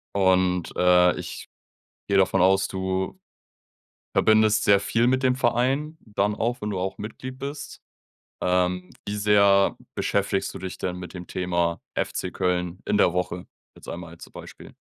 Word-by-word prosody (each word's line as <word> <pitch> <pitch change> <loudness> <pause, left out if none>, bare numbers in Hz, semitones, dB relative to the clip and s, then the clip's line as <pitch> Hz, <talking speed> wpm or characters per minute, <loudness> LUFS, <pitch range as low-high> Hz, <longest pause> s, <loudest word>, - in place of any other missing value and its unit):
Und, 95 -2 +2
äh, 90 0 +5
ich - - -8 0.6
gehe 100 - 0
davon 95 -1 +3
aus, 95 +1 +4
du 95 0 -3 1.0
verbindest 110 0 +4
sehr 100 -1 +5
viel 115 +4 +1
mit 130 +1 +1
dem 125 0 +3
Verein, 135 +5 0
dann 105 -1 -1
auch, 120 +2 -1
wenn 105 0 -3
du 95 - -3
auch 95 +1 -3
Mitglied 130 +5 -7
bist. 140 +1 -7 0.6
Ähm, 90 0 0 0.2
wie 105 - -2
sehr 100 -1 +4 0.2
beschäftigst 100 -1 -1
du - - -4
dich 95 0 -7
denn 90 - -3
mit 90 0 -9
dem 90 -1 -8
Thema 85 -2 -1
FC 90 - -2
Köln 90 -1 -1
in 105 - +1
der 90 - +4
Woche, 90 0 -3 0.3
jetzt - - -15
einmal 85 -1 -7
als 85 - -12
Beispiel? - - -12
95 Hz, 155 wpm, -25 LUFS, 90-110 Hz, 1.0 s, äh